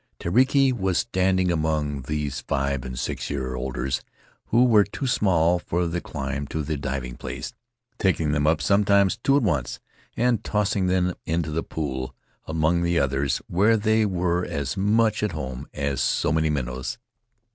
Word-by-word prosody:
Tereki 130 +7 +3
was 95 -6 0
standing 95 -4 +1
among 75 -3 -1
these 75 -2 -2
five 70 -1 -1
and 65 -1 -6
six - - -3
year 65 -3 -3
olders, 65 +1 -2 0.5
who 120 +2 +4
were 110 -4 +6
too 100 +7 -5
small 90 -8 +2
for 85 0 -1
the 85 +1 -2
climb 70 -1 -4
to 80 +1 -3
the 75 +2 -2
diving 70 -3 -4
place, - - -6 0.5
taking 80 -6 +1
them 75 0 +1
up, 80 0 +2
sometimes 100 -1 +3
two 135 +1 +4
at 145 - +1
once, 75 - -1 0.4
and 120 -3 +2
tossing 105 -2 0
them 90 0 +1
into 80 -1 -1
the 80 +2 -1
pool 65 -6 -4 0.3
among 80 +2 +1
the 85 0 +1
others, 70 -2 0
where 105 +6 +3
they 110 +1 +2
were 90 -3 0
as 70 -6 -3
much 105 +2 +2
at 105 -5 -1
home 65 -2 -5
as 70 -3 -2
so - - +1
many 80 0 +2
minnows. 65 - -3
80 Hz, 165 wpm, -24 LUFS, 70-100 Hz, 0.5 s, were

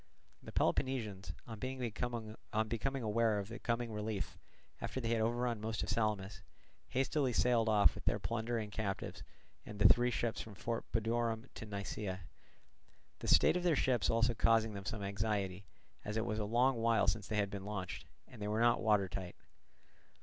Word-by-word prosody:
The - - -9
Peloponnesians, 105 - 0
on 110 -2 -8 1.1
becoming 130 +4 -2
aware 110 0 +2
of 100 0 -3
the 115 - -7
coming 115 0 -1
relief, 105 -3 -3 0.4
after - - -3
they 115 -3 -2
had 115 -1 +2
overrun 120 0 0
most 110 0 -2
of - - -4
Salamis, 105 -3 -1 0.5
hastily 135 +1 +1
sailed 115 -1 +3
off 105 -2 +6
with - - -10
their - - +2
plunder 115 +1 -2
and 105 -2 -4
captives 100 -2 -3 0.4
and 105 - -8
the 105 -1 +8
three 120 +4 +5
ships 120 -1 -1
from 110 -2 -9
Fort 115 +3 -3
Budorum 115 +1 0
to 110 - -8
Nisaea; 100 -2 -4 1.0
the - - -6
state 75 - +6
of 180 - +1
their 175 -3 +3
ships 130 -4 +2
also 115 +1 +3
causing 115 -1 +3
them 100 -1 -6
some 105 -1 -3
anxiety, 100 -1 -2 0.4
as 105 +1 -3
it 110 - 0
was 110 -2 -1
a 105 - -1
long 120 +4 +3
while 115 -2 +3
since 110 -3 0
they 110 - -1
had 100 -1 +1
been 100 -1 -5
launched, 95 -4 -5 0.2
and 115 - -13
they 105 - -2
were 105 +1 0
not 120 0 +4
water 105 -4 +3
tight. 90 -1 -6
110 Hz, 180 wpm, -35 LUFS, 105-115 Hz, 1.1 s, the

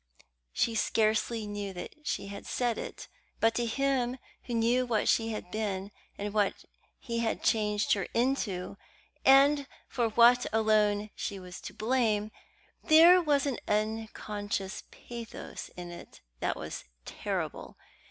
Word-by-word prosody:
She 230 - +1
scarcely 220 0 +1
knew 205 -1 -5
that 180 - -7
she - - -1
had 200 0 -8
said 240 -3 0
it; - - -7 0.3
but 225 0 +3
to 240 0 -1
him 260 0 0 0.3
who 240 - -3
knew 235 +2 +3
what 230 -4 0
she 225 0 +3
had 215 -5 -5
been, 200 -2 -3 0.3
and 205 0 -4
what 205 -2 0 0.3
he 235 -2 -4
had 230 -1 -1
changed 210 -2 +2
her 195 -2 -1
into, 225 -7 0 0.5
and 275 +1 +6 0.2
for 235 -2 0
what 240 +2 +5
alone 215 -1 +2
she 200 - -4
was 180 -1 -9
to - - -8
blame, 220 -3 +1 0.5
there 340 +3 +8
was 295 -4 +2
an 275 -4 -1
unconscious 210 -2 -2
pathos 235 -2 -8
in 175 -1 -7
it 175 - -12 0.2
that - - 0
was - - -6 0.2
terrible. - - -4
220 Hz, 140 wpm, -30 LUFS, 205-245 Hz, 0.5 s, there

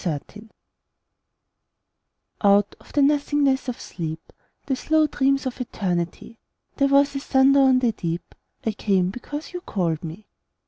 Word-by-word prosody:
The 155 -5 -1
Call 210 +1 -13 1.9
Out 200 0 +4
of - - -18
the 290 - +3
nothingness 285 -2 +2
of 250 0 -4
sleep, 160 -2 -7 0.3
The 270 - 0
slow 315 +3 +2
dreams 275 -2 +1
of 255 0 -4
Eternity, 185 0 -3 0.4
There 275 - +3
was 280 +1 +3
a - - -1
thunder 275 0 +4
on 265 -1 +5
the 245 -2 +2
deep: 170 -4 -5 0.3
I 220 - +1
came, 190 -3 +1
because 290 - -7
you 355 - -5
called 170 - -2
to 170 - -5
me. 180 +7 -10
250 Hz, 150 wpm, -23 LUFS, 185-275 Hz, 1.9 s, on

